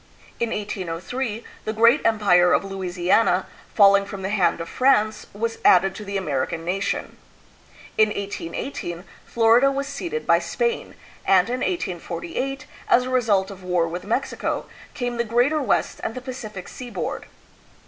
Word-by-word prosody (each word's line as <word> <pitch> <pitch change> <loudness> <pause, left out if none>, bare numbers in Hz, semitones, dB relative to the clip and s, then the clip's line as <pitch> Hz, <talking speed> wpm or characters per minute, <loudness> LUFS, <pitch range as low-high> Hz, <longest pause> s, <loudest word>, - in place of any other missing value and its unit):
In 235 - 0
1803, 210 +3 -4 0.2
the 215 - -3
great 230 +6 +5
empire 195 -5 +4
of - - +3
Louisiana, 185 0 +1 0.3
falling 200 -1 +6
from 195 -1 -7
the 190 - -2
hand 180 -5 +2
of 165 - -5
France, 215 -4 +2
was 230 +3 -3
added 190 +1 +5
to 210 - -8
the 200 -1 -3
American 160 -1 -2
nation. 190 +3 -2 0.8
In 215 - +7
1818, 185 -2 -5 0.2
Florida 235 +4 +4
was 275 0 -2
ceded 345 +11 -4
by - - +4
Spain, 475 -1 -2 0.3
and 190 +2 +4
in 250 +1 -1
1848, 220 - -3 0.2
as 250 - +5
a 255 - -5
result 210 -6 +2
of 190 -1 -11
war 180 -2 +1
with 175 +2 -5
Mexico, 230 +6 -2 0.3
came 245 -3 -3
the 235 - +1
Greater 245 +7 +2
West 235 -8 0
and 225 - -3
the 255 - -5
Pacific 215 -7 -7
seaboard. 245 -2 -5
210 Hz, 150 wpm, -23 LUFS, 185-245 Hz, 0.8 s, In